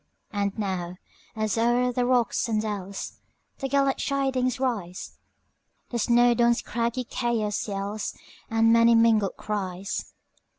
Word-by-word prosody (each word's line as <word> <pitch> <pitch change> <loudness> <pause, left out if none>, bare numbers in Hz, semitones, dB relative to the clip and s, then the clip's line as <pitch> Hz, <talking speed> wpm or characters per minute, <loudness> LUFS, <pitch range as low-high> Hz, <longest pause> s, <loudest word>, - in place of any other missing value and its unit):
And 200 0 -2
now, 185 -4 -3 0.4
as 215 0 -1
o'er 245 +2 +2
the 245 0 0
rocks 245 -2 +2
and 215 -1 +1
dellsThe 205 +5 -6
gallant 275 0 +2
chidings 265 -2 0
rise, 205 -9 -3 0.7
All 235 - 0
Snowdon's 240 0 +3
craggy 235 +2 -1
chaos 235 -3 -1
yellsThe 210 +2 -3
many 230 +1 +6
mingled 225 -4 +3
cries! 195 -2 -4
230 Hz, 110 wpm, -26 LUFS, 205-245 Hz, 0.7 s, many